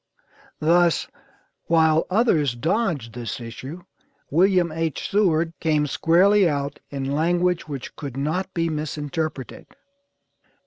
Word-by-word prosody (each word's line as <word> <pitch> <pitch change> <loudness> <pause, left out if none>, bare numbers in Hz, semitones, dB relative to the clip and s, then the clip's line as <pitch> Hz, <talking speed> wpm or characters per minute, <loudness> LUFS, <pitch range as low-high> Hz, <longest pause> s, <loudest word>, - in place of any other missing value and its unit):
Thus, 170 +2 +3 0.6
while 160 -1 +3
others 175 - +2
dodged 150 - -1
this 120 0 -5
issue, 130 +8 -8 0.5
William 180 +1 +3
H. 160 -2 -3
Seward 170 -5 +2
came 155 -3 +1
squarely 185 +6 +4
out 140 -1 -3
in 135 -1 -4
language 175 +3 +1
which 140 -4 -7
could 140 -4 -7
not 175 +7 -2
be 165 -1 +1
misinterpreted. 155 -2 -4
160 Hz, 105 wpm, -23 LUFS, 145-175 Hz, 0.6 s, squarely